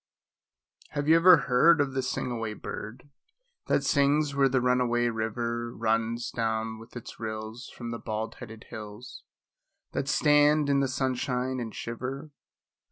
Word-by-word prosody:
Have 145 0 -2
you 160 - +7
ever 175 +1 +8
heard 155 +7 +5
of 140 -2 +1
the 135 - 0
sing 130 0 -3
away 115 -2 -3
bird, 125 +8 -8 0.6
That - - +2
sings 145 +1 +2
where 140 -1 +3
the 130 0 +2
run 125 0 +2
away 120 -1 +1
river 115 +1 -3
Runs 115 +1 -1
down 110 -1 -2
with 115 +2 -14
its 120 - -9
rills 110 +1 -6
from 120 -1 -7
the 115 - -5
bald 110 0 -4
headed 110 -3 -10
hills 105 +3 -9 0.7
That 135 - -2
stand 150 0 +4
in 140 - +3
the 135 - +2
sunshine 130 0 -1
and 115 -2 -4
shiver? 130 +5 -5
125 Hz, 155 wpm, -28 LUFS, 115-140 Hz, 0.7 s, ever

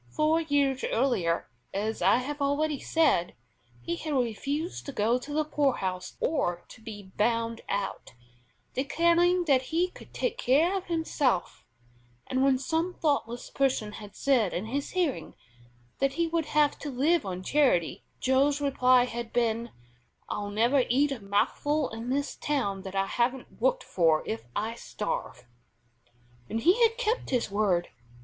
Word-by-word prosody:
Four 310 - +2
years 285 -4 +1
earlier, 220 -10 +1 0.3
as 215 +3 -2
I - - +5
have 285 +4 -3
already 285 +1 +1
said, 310 - +2 0.5
he 170 +6 -2
had 310 -2 -4
refused 275 - -2
to - - -3
go 235 +1 +1
to 280 +4 -9
the 305 +1 +1
poorhouse 195 -12 -1
or 175 - -1
to - - -14
be 205 -4 -9
"bound 230 +1 0
out," 200 -10 -3 0.6
declaring 340 +6 +2
that 275 -5 +4
he 335 +7 0
could - - -14
take 485 0 -2
care 320 - +3
of 385 -1 -3
himself; 300 - -1 0.6
and 260 +1 0
when 270 -1 +4
some 325 +6 -1
thoughtless 260 -6 -1
person 260 -6 0
had 210 -1 -10
said 245 -9 +2
in 185 - -2
his 275 +5 -3
hearing 350 -7 -1 0.6
that 275 0 +1
he 335 - +1
would 330 -1 -1
have 300 -1 +2
to 295 - -5
live 295 +6 +2
on 185 -1 -5
charity, 255 - +2 0.2
Joe's 275 +2 +2
reply 255 -3 +4
had 235 -1 -5
been: 235 -1 0 0.6
"I'll 205 -1 -3
never 235 +6 +3
eat 280 +4 +3
a 270 - -3
mouthful 260 +9 0
in 225 +2 -6
this 280 +2 -1
town 240 -10 -1
that 190 0 -8
I 195 0 +2
haven't 245 +5 -2
worked - - +2
for 165 -3 +2
if 115 +1 -4
I 220 +2 -1
starve." 210 - -5 1.0
And 225 - -2
he 365 - +4
had 455 0 +4
kept 485 -1 -1
his 245 -6 0
word. 195 -4 +1
260 Hz, 155 wpm, -28 LUFS, 215-300 Hz, 1.0 s, I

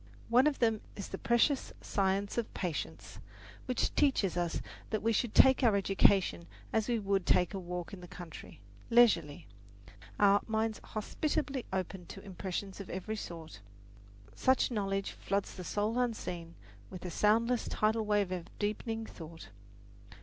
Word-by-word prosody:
One 250 +5 +6
of 300 - +1
them 225 -3 +2
is 200 - -6
the 190 - -5
precious 240 +4 +2
science 195 0 0
of 230 - -3
patience, 100 - -4 0.5
which 255 - 0
teaches 260 - +2
us 175 -1 -1 0.3
that 215 -2 -2
we 230 0 +3
should 225 0 0
take 265 +1 +7
our 225 -4 +5
education 195 -2 +3 0.3
as 220 -1 +1
we 240 -1 +1
would 200 -2 0
take 180 +3 +3
a 195 - -3
walk 180 0 -5
in 190 - -8
the 175 - -9
country, 170 - -10 0.3
leisurely, 200 -12 +4 0.7
our 200 0 +6
minds 220 0 -1
hospitably 275 +4 -2
open 185 -1 -3
to 195 - -10
impressions 190 0 -5
of 200 - -7
every 190 +4 -4
sort. 165 - -8 0.7
Such 260 - +2
knowledge 195 -3 -1
floods 200 0 -2
the 185 - -7
soul 210 +6 -1
unseen 175 -9 -3 0.3
with 185 0 -8
a 180 - -4
soundless 230 +6 +2
tidal 220 +1 +1
wave 205 -3 +1
of 180 -2 -4
deepening 225 +2 -2
thought. 165 -4 -10
200 Hz, 150 wpm, -32 LUFS, 180-225 Hz, 0.7 s, take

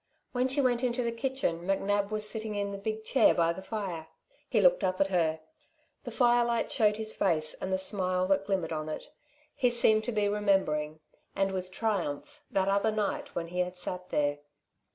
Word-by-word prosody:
When 250 0 +1
she 270 +2 +1
went 245 -2 +1
into 250 0 0
the 235 - -1
kitchen 230 -8 -1
McNab 200 +2 0
was 215 0 0
sitting 215 -1 -3
in 200 0 -2
the 200 - -6
big 220 +2 -4
chair 265 - +4
by 170 0 +2
the 190 - -8
fire. 190 -6 -5 0.4
He - - +2
looked - - +4
up 185 0 0
at 195 - +2
her. 160 -4 +1 0.6
The - - -4
firelight 240 -2 +2
showed 210 -4 +3
his 220 0 0
face 155 -5 0
and 190 - -3
the 190 - +2
smile 185 -1 0
that 195 0 +2
glimmered 185 -5 -1
on 155 0 -4
it. 155 - -6 0.4
He 250 - +2
seemed 220 -2 +4
to 245 - -1
be 210 -2 +1
remembering, 190 -7 0 0.3
and 195 0 +1
with 185 -1 -4
triumph, 220 - -3
that 190 -1 +1
other 200 +2 +2
night 215 -2 -2
when 170 -1 -3
he 180 +1 -4
had 180 0 -1
sat 180 0 -6
there. 145 0 0
200 Hz, 195 wpm, -29 LUFS, 180-220 Hz, 0.6 s, chair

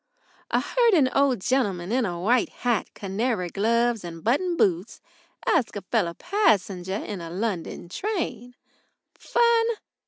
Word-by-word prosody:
I - - +2
heard 475 -4 +3
an 265 -6 +3
old 275 -6 +2
gentleman 200 -7 0
in 245 -2 +1
a 175 -2 -4
white 235 +7 +2
hat, 240 -5 -1
canary 200 -1 -2
gloves, 230 +3 +1
and 165 -1 -8
buttoned 335 - +1
boots 185 - +1 0.5
asking 225 -4 +1
a - - -49
fellow 170 -1 +1
passenger 195 - +1
in 200 -4 -5
a 165 - -7
London 185 -2 -3
train. 280 - -4 0.6
Fun? 470 -1 +2
225 Hz, 135 wpm, -25 LUFS, 185-260 Hz, 0.6 s, heard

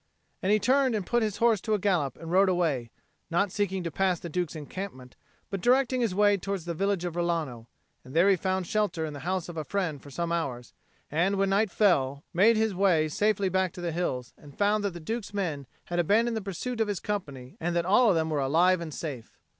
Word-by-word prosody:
And 190 - +1
he 210 - +5
turned 260 +3 +2
and 205 -4 -2
put 240 +4 +1
his 210 -2 -1
horse 230 -4 +3
to 215 - 0
a - - +1
gallop 180 -10 0
and 165 0 -8
rode 190 +2 +5
away, 155 -10 0 0.4
not 180 +3 +1
seeking 195 -2 -1
to 170 - -3
pass 185 0 +1
the 170 - -7
Duke's 175 0 -2
encampment, 150 -4 -7 0.4
but 195 -2 -3
directing 255 +2 +3
his 220 -6 0
way 205 0 +4
towards 195 -2 -4
the 170 - -3
village 195 +1 0
of 170 -2 -4
Rilano; 160 -9 -2 0.4
and 130 +3 -12
there 170 +4 +5
he 200 - +5
found 185 +1 -1
shelter 205 -4 0
in 155 - -5
the 145 - -7
house 185 -2 -1
of 175 -2 -8
a 155 - -2
friend 165 -5 -2
for 145 - -12
some 170 +4 -3
hours, 130 -8 -3 0.4
and 175 +6 +2
when 195 0 +1
night 205 +2 +2
fell, 140 -9 +2
made 215 +6 +5
his 220 -1 +1
way 175 -5 +3
safely 205 +3 +1
back 185 -1 0
to 180 - -8
the 175 -1 -2
hills, 130 -8 -3
and 145 -2 -15
found 205 +1 +2
that 200 -3 -1
the 175 - -7
Duke's 210 +4 -5
men 155 -9 -2 0.2
had 175 0 -2
abandoned 225 +7 +2
the 220 - -2
pursuit 225 +5 -4
of 220 - +2
his 205 -3 -2
company 140 -11 -5
and 175 +1 -2
that 170 -1 +1
all 215 +6 +5
of 190 - +3
them 160 -1 0
were 150 - 0
alive 170 +6 +3
and 165 -2 -5
safe. 135 -8 -7
180 Hz, 235 wpm, -28 LUFS, 160-205 Hz, 0.4 s, he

